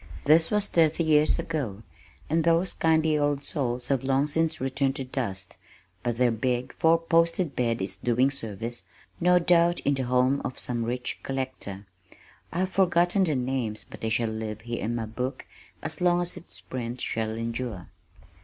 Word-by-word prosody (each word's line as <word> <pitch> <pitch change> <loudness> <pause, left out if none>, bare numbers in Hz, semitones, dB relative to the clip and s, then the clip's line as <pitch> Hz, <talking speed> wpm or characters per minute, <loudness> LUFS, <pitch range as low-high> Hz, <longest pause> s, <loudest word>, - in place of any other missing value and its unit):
This 160 +2 +5
was 210 -1 +2
thirty 160 0 +3
years 155 -1 +4
ago, 120 -11 -3 0.4
and 160 +2 +1
those 170 +2 +3
kindly 160 -1 +2
old 145 -1 0
souls 125 -5 -2
have 135 -2 +1
long 135 +1 +2
since 160 +1 0
returned 135 +1 0
to 135 - -3
dust, 100 -8 -4 0.4
but 120 -2 -2
their 125 -1 +3
big 125 +3 -1
four 165 +1 +4
posted 165 -1 +1
bed 115 -4 0
is 95 0 -1
doing 125 +5 +2
service, 115 -3 -4 0.4
no 180 +1 +5
doubt, 175 0 +4
in 145 - +2
the 130 -2 -1
home 125 +2 +2
of 130 - -4
some 120 -2 -2
rich 125 +1 -3
collector. 130 -7 -4 0.7
I 175 - -1
have 185 0 -1
forgotten 180 0 +3
their 155 -4 0
names 125 -4 -1
but - - -12
they 110 - -1
shall 115 +1 +1
live 110 -1 -4
here 120 +1 -4
in 115 +2 -1
my 115 -1 -2
book 125 +4 -4 0.4
as 155 0 -4
long 175 0 +4
as 175 - -3
its 180 -1 -10
print 125 -1 -5
shall 110 -2 -2
endure. 115 -3 -4
135 Hz, 175 wpm, -27 LUFS, 120-160 Hz, 0.7 s, This